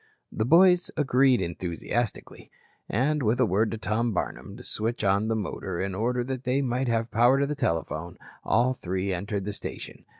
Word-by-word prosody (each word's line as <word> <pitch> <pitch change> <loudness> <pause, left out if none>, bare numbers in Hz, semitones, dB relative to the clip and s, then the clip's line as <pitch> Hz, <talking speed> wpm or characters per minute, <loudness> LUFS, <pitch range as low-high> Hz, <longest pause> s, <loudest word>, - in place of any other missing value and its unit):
The 110 - -1
boys 180 +5 +5
agreed 135 -3 +3
enthusiastically, 90 +7 -4 0.4
and 145 +7 +1
with 115 0 +1
a 130 - +5
word 105 +3 +1
to 115 - -4
Tom 110 +1 -1
Barnum 100 +2 -4
to 125 - -11
switch 115 +1 -2
on 100 +2 +2
the 115 - 0
motor 95 -3 -4
in 95 0 -2
order 120 +5 0
that 130 0 -4
they 135 +2 +1
might 125 +1 -1
have 115 0 0
power 120 +4 +4
to 145 - -2
telephone, 85 - -2 0.3
all 125 +3 +2
three 95 -3 -3
entered 100 +2 -3
the 105 - -3
station. - - -7
115 Hz, 175 wpm, -26 LUFS, 100-130 Hz, 0.4 s, boys